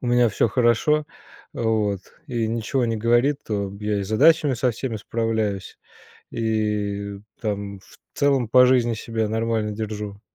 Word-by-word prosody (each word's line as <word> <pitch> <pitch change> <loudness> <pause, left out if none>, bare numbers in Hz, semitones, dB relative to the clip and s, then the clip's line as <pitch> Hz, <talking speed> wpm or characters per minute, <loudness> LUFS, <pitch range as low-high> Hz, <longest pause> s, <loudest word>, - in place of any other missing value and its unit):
у 125 - -5
меня 120 0 +4
всё 110 - +1
хорошо, 125 +7 +2 0.5
вот, 110 -4 0 0.3
и 120 -5 -1
ничего 115 +3 -1
не 115 -1 -1
говорит, 120 +6 +2
то 100 -2 -2
я 105 -1 -1
и - - -2
с 95 - -6
задачами 145 +5 +4
со 125 +2 +1
всеми 115 0 -4
справляюсь, 110 -2 -2 0.5
и 105 -3 -2 0.2
там 100 -2 -3
в - - -19 0.2
целом 140 -4 +2
по 125 +3 +6
жизни 120 -2 +3
себя 110 0 -2
нормально 110 0 -1
держу. 105 -1 -5
110 Hz, 150 wpm, -23 LUFS, 105-120 Hz, 0.5 s, по